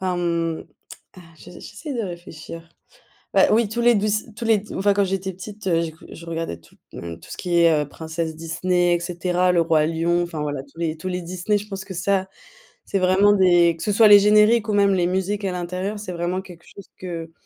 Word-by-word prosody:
ah, 185 -1 -1
mmh, 170 -2 -1 0.6
heu, 185 - -12
je - - -14
j'essaie 230 - -8
de 235 - -2
réfléchir. 170 -3 -9 0.7
Bah - - +6
oui, 225 0 +3
tous 230 +3 -3
les 240 -1 +5
douc 210 +1 0 0.3
tous 235 - -6
les 220 -3 +3
enfin 200 +1 +1
quand 200 - +2
j'étais 190 0 -3
petite, 200 +3 -10
heu, 170 -2 +2
j'écou 160 -1 -7
je 170 - -11
regardais 165 - -4
tout, 85 - -23 0.2
heu, 85 -1 -7
tout 80 - -16
ce - - -6
qui 175 -1 0
est, 165 -3 +4
heu, 145 - -7
princesse 160 +1 -5
Disney 175 +2 0
et 175 - -1
cetera, 180 +1 0
le 175 -1 +3
Roi 160 -2 +2
Lion, 165 +2 0
enfin 165 -3 -4
voilà, 145 -2 -3
tous - - -19
les 165 -1 -2
tous 165 +4 -6
les 180 0 -3
Disney, 185 +4 -1
je 205 - -9
pense 195 -2 -6
que 190 0 -8
ça, 190 +2 0 0.6
c'est 195 - -1
vraiment 190 +3 +4
des 175 -3 +4
que 165 - -12
ce 210 - 0
soit 215 +2 +6
les 205 -1 +9
génériques 210 +2 +4
ou - - +1
même 200 -1 +4
les 180 -2 +1
musiques 190 +3 -2
à 190 - -1
l'intérieur, 180 +3 -4
c'est 205 -3 -7
vraiment 175 +2 -2
quelque 175 -3 -14
chose 200 - -13
que 165 -3 -6
180 Hz, 225 wpm, -22 LUFS, 165-200 Hz, 0.7 s, les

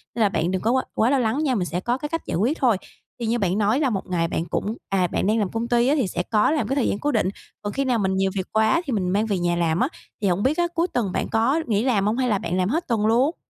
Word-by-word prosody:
nên 230 - -1
là 205 - +4
bạn 170 0 -1
đừng 185 - -1
có 230 - +1
quá 260 0 +2
quá 225 +3 +2
lo 275 - +3
lắng 250 +6 0
nha, 260 -4 +1
mình 180 -4 0
sẽ 175 +1 -2
có 240 +6 -1
cái 295 +2 -5
cách 330 - -2
giải - - -3
quyết 250 - +1
thôi. 235 -7 +3 0.4
Thì 235 - -3
như 235 +2 0
bạn 190 0 0
nói 215 +6 +2
là 275 -4 +2
một 195 -4 -3
ngày 165 -2 0
bạn 165 - -2
cũng, 205 +6 -2
à, 185 -2 +2
bạn 190 - -1
đang 220 +1 +2
làm 200 -3 0
công 230 +1 -2
ty 240 +1 +2
á 290 - +3
thì 250 -9 +1
sẽ 180 - -2
có 215 +7 +2
làm 310 - 0
cái 270 - -1
thời 275 - +1
gian 200 - -2
cố 295 - 0
định, 210 -6 +1 0.3
còn 205 -1 -4
khi 275 0 -1
nào 245 -3 +1
mình 190 -1 0
nhiều 190 0 +1
việc 190 -1 -2
quá 220 +10 +3
thì 265 - -2
mình 185 -4 0
mang 205 +4 +1
về 205 -4 -1
nhà 175 0 +1
làm 170 -1 +1
á, 255 - +3 0.3
thì 200 - +1
hổng 185 +3 +1
biết 285 +5 +1
á 345 0 +2
cuối 335 +2 +1
tuần 210 -7 0
bạn - - -1
có 260 +9 +2
nghỉ 215 0 +1
làm 215 -7 +2
hông 215 +4 +1
hay 255 -2 +1
là 205 - +2
bạn 180 +2 -2
làm 185 +1 +1
hết 330 +7 -1
tuần 220 -3 +1
luôn? 255 +9 +3
220 Hz, 335 wpm, -23 LUFS, 190-255 Hz, 0.4 s, là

